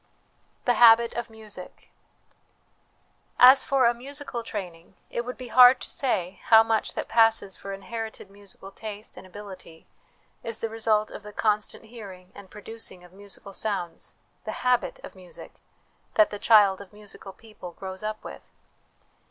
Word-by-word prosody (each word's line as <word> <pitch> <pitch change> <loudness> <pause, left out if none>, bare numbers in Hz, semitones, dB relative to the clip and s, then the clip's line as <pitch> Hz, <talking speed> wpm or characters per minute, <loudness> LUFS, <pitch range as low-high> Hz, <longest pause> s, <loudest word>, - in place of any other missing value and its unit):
The 245 - +4
Habit 235 0 +7
of 240 -1 -4
Music. 215 -4 -11 1.5
As 255 +2 +8
for 270 -2 +2
a 235 - +4
musical 270 0 -6
training, 185 -6 -8 0.2
it 235 - -3
would 250 - -6
be 255 -2 -8
hard 250 +1 +8
to - - -8
say 190 -9 -1
how 225 -1 +7
much 225 -1 -1
that - - -3
passes 225 -4 +3
for 195 - -8
inherited 220 +1 -7
musical 200 -1 -13
taste 210 +1 -9
and - - -12
ability 185 -4 -12 0.6
is 230 -1 -5
the 225 - -3
result 220 -1 0
of - - -8
the 210 0 -10
constant 210 +1 -1
hearing 195 -5 -12
and 200 -2 -13
producing 210 -3 -10
of 180 0 -17
musical 200 0 -12
sounds, 190 -5 -4 0.3
the - - -5
habit 250 -1 +1
of - - -10
music, 185 -2 -13 0.6
that 215 - +5
the 205 - -6
child 200 -4 +5
of 200 - -13
musical 205 -1 -11
people 210 -4 -12
grows 190 +1 -8
up 215 0 -5
with. - - -11
215 Hz, 155 wpm, -26 LUFS, 195-230 Hz, 1.5 s, As